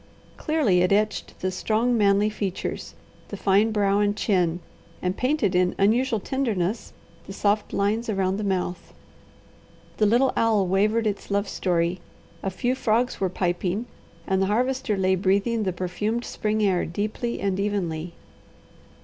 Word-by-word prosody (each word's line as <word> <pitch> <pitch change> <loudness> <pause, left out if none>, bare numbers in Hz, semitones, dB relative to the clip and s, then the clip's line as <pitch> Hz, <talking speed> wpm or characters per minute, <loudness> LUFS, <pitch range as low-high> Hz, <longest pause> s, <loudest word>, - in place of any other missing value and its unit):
Clearly 275 - +2
it 180 - +2
etched 210 +2 0
the 185 - 0
strong, 220 +6 +1
manly 205 -1 +3
features, 195 -3 -4 0.3
the - - -7
fine 205 +3 +3
brow 200 -1 +2
and 205 0 +1
chin, 180 -5 +1 0.4
and 180 +1 -1
painted 255 -6 +1
in 180 0 +2
unusual 225 +3 +2
tenderness 220 -5 -2 0.4
the 195 - -7
soft 205 +1 0
lines 215 +4 0
around 195 -2 0
the 210 - -3
mouth. 185 -2 -3 1.0
The 215 - +3
little 245 +5 +3
owl 220 -4 +2
wavered 210 +5 +2
its 205 -2 -3
love 200 +1 0
story, 175 0 0 0.4
a 195 - -1
few 245 +7 -1
frogs 245 -1 0
were 190 - +2
piping, 180 +4 -1 0.4
and 190 0 +1
the 195 - +2
Harvester 245 0 0
lay 190 0 +2
breathing 200 +5 +1
the 185 - +1
perfumed 210 +7 -2
spring 215 0 -1
air 190 -3 +2
deeply 215 +6 -3
and 195 -1 -1
evenly. 180 -5 -2
200 Hz, 150 wpm, -25 LUFS, 185-220 Hz, 1.0 s, manly